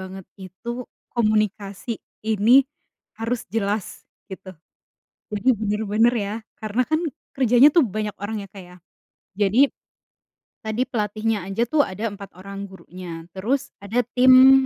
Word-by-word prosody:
banget 190 0 -8
itu, 230 +7 -7 0.3
komunikasi, 215 0 0 0.2
ini 220 +1 +2 0.6
harus 230 +1 -2
jelas, 205 0 -2 0.2
gitu. 190 -1 -9 0.8
Jadi 210 +4 0
bener-bener 215 +2 +2
ya, 200 - -3 0.2
karena 220 +2 -1
kan 315 0 +2 0.4
kerjanya 250 +2 +6
tuh 335 -6 +6
banyak 210 0 -3
orang 205 +3 -4
ya 200 - -9
Kak 195 -1 -11
ya, 180 0 -15 0.6
jadi 220 +8 +4 0.9
tadi 220 +2 -1
pelatihnya 215 0 -1
aja 195 +4 -2
tuh 305 +2 +4
ada 210 +4 -3
4 200 -1 -9
orang 195 +1 -7
gurunya, 180 -3 -10
terus 260 +9 -1
ada 225 +5 +1 0.2
tim, 260 +1 +8
215 Hz, 125 wpm, -23 LUFS, 195-235 Hz, 0.9 s, tim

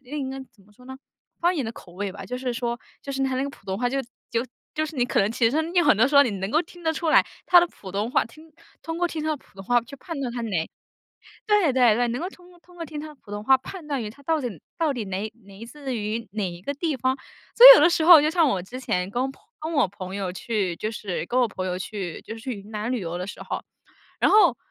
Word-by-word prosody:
那 250 - -17
个 - - -2
应 265 -1 -3
该 270 - -6
怎 210 -4 -24
么 210 - -23
说 250 +4 -18
呢？ 265 - -8 0.4
方 350 +2 +3
言 290 -6 -1
的 225 - -3
口 175 -6 -14
味 200 +2 -4
吧。 200 - -9
就 250 - -5
是 250 -1 -3
说， 235 0 -2 0.2
就 275 - -5
是 270 - -1
他 265 -1 0
那 265 - 0
个 280 - -3
普 - - -19
通 190 0 -2
话 245 - 0
就 270 +2 0 0.3
就 235 +2 -1 0.3
就 310 0 0
是， 310 - -9
你 245 - +2
可 - - +1
能 200 +2 +1
其 230 -1 +2
实 285 - -1 0.2
有 350 - +4
很 - - +6
多 225 +6 +3
时 285 - +2
候 280 - +10
你 245 - 0
能 195 0 -4
够 315 +6 +3
听 350 +1 -16
得 320 - +1
出 320 0 -1
来 - - +7 0.2
他 355 -1 +7
的 345 - +2
普 195 - -12
通 210 +4 -1
话 - - +2
听 310 +7 -16 0.3
通 325 0 -4
过 350 +1 +1
听 320 -2 -4
他 310 - -2
的 310 - 0
普 - - -24
通 195 - -8
话 245 +4 +3
去 250 +4 -11
判 330 +2 -7
断 255 -3 -3
他， 240 - -4
哪 190 -8 -2 0.8
对 415 -9 +3
对 245 -4 +5
对， 245 +2 +1
能 240 +3 -2
够 355 - -3
通 360 -2 -17
通 355 0 -20
过 335 - -5
听 305 -2 -7
他 310 - -7
的 305 - -12
普 230 -7 -18
通 205 0 -5
话 265 +4 +5
判 325 +4 -10
断 280 -4 -2
于 210 - -5
他 280 +6 -17
到 320 0 +1
底 205 -11 -5 0.2
到 320 -3 +1
底 240 -4 -4
哪 195 +3 -3
来自 235 +6 -8
于 220 +1 -3
哪 205 -3 -2
一 175 - -10
个 280 +10 -4
地 315 +1 -1
方。 260 +2 +1 0.4
所 485 - +8
以 - - +15
有 - - +5
的 325 - +7
时 335 -2 +1
候， 335 -2 +10
就 300 - +2
像 330 0 +3
我 190 - 0
之 245 +7 -8
前 180 -7 -1
跟 240 +5 -1
朋 - - -23 0.2
跟 315 +2 -4
我 280 - +3
朋 185 -1 -8
友 195 -2 -3
去， 190 -3 -2
就 215 - -3
是 200 -6 -4
跟 250 +5 +1
我 245 - +3
朋 185 -3 -5
友 180 -1 -2
去 190 -3 -5
就 225 - -7
是 225 - -10
去 255 +2 -4
云 200 +2 -14
南 215 +3 -3
旅 245 - -1
游 175 -1 -4
的 180 - -4
时 205 - -8
候， - - -4 0.6
然 - - +4
后 425 - +6
245 Hz, 325 characters per minute, -24 LUFS, 210-300 Hz, 0.8 s, 以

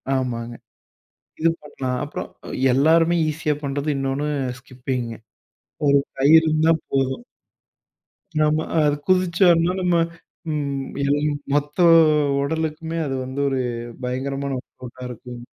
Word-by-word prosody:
ஆமாங்க. 120 -2 -2 0.9
இது 165 - +4
பண்லாம். 130 -3 -4
அப்பறம், - - -6 0.4
எல்லாருமே 165 +5 +4
ஈஸியா 150 -1 -1
பண்றது, 140 +2 -2
இன்னொன்னு 135 +2 -1 0.3
ஸ்கிப்பிங்க, 125 -2 -4 0.7
ஒரு 140 0 +5 0.2
கயிறு 155 +4 +6
இருந்தா 155 +1 +4 0.2
போதும். 135 - 0 1.2
நம்ம, 155 +1 +2 0.2
அது 145 -1 +3
குதிச்சம்னா 180 -2 +4
நம்ம 180 -1 +2 0.6
ம் 140 -2 -2 0.2
எழும் 145 +1 +1 0.2
மொத்த 145 +2 -1 0.6
உடலுக்குமே 160 +2 -2
அது 135 - -2
வந்து 130 +2 -5
ஒரு 135 -1 -1 0.4
பயங்கரமான 135 +2 -2
ஒர்க் - - -37
அவுட்டா 125 0 -9
இருக்கும். 125 0 -9
140 Hz, 110 wpm, -22 LUFS, 130-160 Hz, 1.2 s, கயிறு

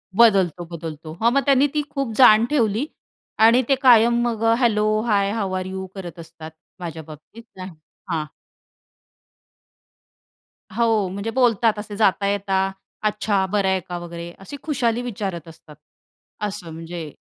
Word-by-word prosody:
बदलतो, 190 -7 +4
बदलतो. 160 -2 -8
हां, 235 +1 +4
मग 275 - +3
त्यांनी 275 +1 +4
ती 300 - +1
खूप 275 -5 -3
जाण 225 -3 +7
ठेवली. 235 -2 +1 0.6
आणि 240 +3 +6
ते 275 - +5
कायम 235 -1 +5
मग 230 -1 -3 0.2
hello 215 -4 +2 0.2
hi 200 -2 +2
how 200 -4 -2
are 185 - -4
you? 190 0 -5
करत 175 -3 -8
असतात 160 -1 -11 0.3
माझ्या 165 -2 -6
बाबतीत. 155 +9 -13
नाही, 185 0 -7 0.4
हां. 155 -2 -1 2.5
हो. 225 -4 +2
म्हणजे 200 +4 -4
बोलतात 230 -4 +2
असे 210 -1 -7
जाता 200 -2 +2
येता, 195 -1 0 0.3
अच्छा, 210 -2 0
बरं 195 0 0
आहे 190 0 +2
का 175 - -4
वगैरे? 170 0 -8
अशी 240 +9 -9
खुशाली 245 -6 0
विचारत 195 -8 -5
असतात. 155 -2 -15 0.7
असं 195 -5 -6
म्हणजे 165 -2 -7
200 Hz, 145 wpm, -22 LUFS, 175-230 Hz, 2.5 s, जाण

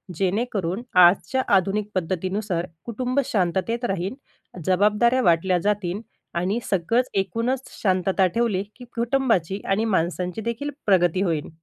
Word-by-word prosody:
जेणेकरून 195 +1 -1 0.2
आजच्या 185 +9 +5
आधुनिक 200 +3 +1
पद्धतीनुसार 185 +1 -1 0.2
कुटुंब 250 +3 -1
शांततेत 220 +2 0
राहीन, 190 -1 -2 0.5
जबाबदाऱ्या 210 +7 +3
वाटल्या 180 -2 +3
जातील 200 0 -1 0.4
आणि 195 +6 0
सगळंच 230 +7 +1
एकूणच 230 +7 -1
शांतता 190 -1 +2
ठेवली 205 0 0
की 250 - -11
कुटुंबाची 230 - +1
आणि 210 +3 +1
माणसांची 180 0 -1
देखील 235 +6 -3 0.2
प्रगती 185 -2 +3
होईल. 165 -6 -1
195 Hz, 115 wpm, -24 LUFS, 180-230 Hz, 0.5 s, आजच्या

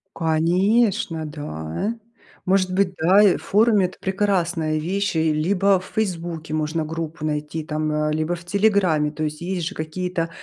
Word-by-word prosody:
Конечно, 170 +2 +1
да. 145 - -4 0.5
Может 185 0 +2
быть, 190 -1 +1
да, 185 +6 +5
и 200 -4 +5
в - - -13
форуме, 210 -1 +3
это 185 - -6
прекрасная 175 -5 0
вещь, 190 +3 -1
и 160 -1 +2
либо 190 +5 +2
в 185 - -11
Фейсбуке 170 -6 -3
можно 155 +1 -1
группу 160 0 -5
найти 150 +1 -3
там, 155 0 -2
э, 150 0 0
либо 155 +2 -1
в 170 - -11
Телеграме. 185 -6 +2
То 155 0 -5
есть, 155 +1 -3
есть 175 -2 -2
же 200 - -6
какие-то, 165 +2 -3
170 Hz, 160 wpm, -22 LUFS, 155-190 Hz, 0.5 s, да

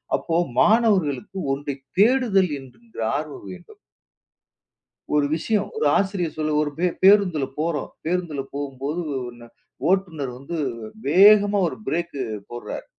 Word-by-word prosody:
அப்போ 165 - -2 0.3
மாணவர்களுக்கு 195 - +2
ஒன்றைக் 135 -1 -4
தேடுதல் 210 -4 +4
என்கின்ற 135 - -15 0.2
ஆர்வம் 145 -7 -5
வேண்டும். 90 -1 -13 1.4
ஒரு 145 -1 +3
விஷயம் 205 +5 -1
ஒரு 445 - 0
ஆசிரியர் 190 -4 -1
சொல்ல, 155 -1 -1
ஒரு 150 - -2
பே 180 - +2 0.2
பேருந்துல 190 -8 +5
போறோம். 155 -3 -1 0.2
பேருந்துல 170 -4 -1
போம்போது 140 +3 -4 0.3
ஒண்ணு 120 -1 -12 0.4
ஓட்டுநர் 165 -9 0
வந்து 140 +6 -6 0.5
வேகமா 205 +4 +6
ஒரு 130 - -7
ப்ரேக் 170 +1 -2 0.3
போடுறார். 120 0 -6
165 Hz, 115 wpm, -23 LUFS, 140-195 Hz, 1.4 s, வேகமா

